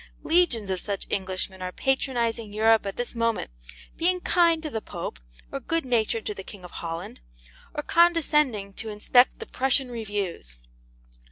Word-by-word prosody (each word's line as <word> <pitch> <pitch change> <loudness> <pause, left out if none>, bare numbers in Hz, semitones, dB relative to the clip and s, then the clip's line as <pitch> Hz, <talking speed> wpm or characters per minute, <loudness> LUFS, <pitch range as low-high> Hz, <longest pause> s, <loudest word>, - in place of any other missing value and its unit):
Legions 310 - +2
of 185 - -1
such 200 -2 -3
Englishmen 190 0 -2
are 180 0 -3
patronizing 235 -3 0
Europe 220 0 +3
at 195 - -4
this 245 - -3
moment, 230 - -1 0.5
being 360 +2 +2
kind 335 -2 +3
to 305 - -4
the 220 - -3
Pope, 60 - -6 0.3
or - - -3
good 330 -3 -1
natured 225 -2 +1
to 210 - -2
the 195 - -7
King 195 0 -11
of 180 - -10
Holland, 165 - -6 0.6
or 295 - -2
condescending 300 -13 +3
to 220 +3 -5
inspect 245 +4 +4
the - - -7
Prussian 265 0 +1
reviews. 205 - -4
225 Hz, 160 wpm, -26 LUFS, 200-270 Hz, 0.6 s, inspect